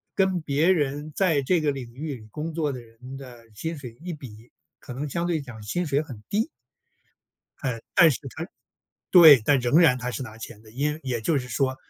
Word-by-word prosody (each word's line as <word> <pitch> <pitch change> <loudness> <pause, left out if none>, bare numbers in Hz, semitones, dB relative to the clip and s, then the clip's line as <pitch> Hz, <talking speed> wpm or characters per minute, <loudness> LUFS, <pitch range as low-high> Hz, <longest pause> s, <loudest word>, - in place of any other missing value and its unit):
跟 190 -2 +2
别 150 +3 +1
人 145 -2 -1
在 165 -7 +2
这 170 +6 +2
个 150 -2 +1
领 125 -4 -7
域 145 +1 -5
里 110 -3 -13
工 155 +2 -5
作 155 -3 -1
的 130 - -6
人 125 +3 -11
的 120 -4 -12
薪 165 +9 -4
水 125 -5 -10
一 180 0 -5
比， 120 -6 -12 0.3
可 125 - -9
能 140 +3 -4
相 170 +4 -2
对 165 -3 0
讲 120 -6 -10
薪 175 +13 -2
水 145 -1 +1
很 120 -9 -10
低。 215 +3 0 1.1
呃， 125 -3 -3
但 165 -2 +7
是 135 - 0 0.2
他 165 +2 -5 0.6
对， 160 -8 +9
但 140 +3 +4
仍 125 +5 +3
然 140 -7 +5
他 125 0 -3
是 130 - -4
拿 110 -4 -9
钱 115 -1 -9
的。 110 - -16
因 150 +5 -1
也 125 -4 -2
就 145 +6 +1
是 125 -1 -6
说 130 +2 0
140 Hz, 225 characters per minute, -25 LUFS, 125-160 Hz, 1.1 s, 对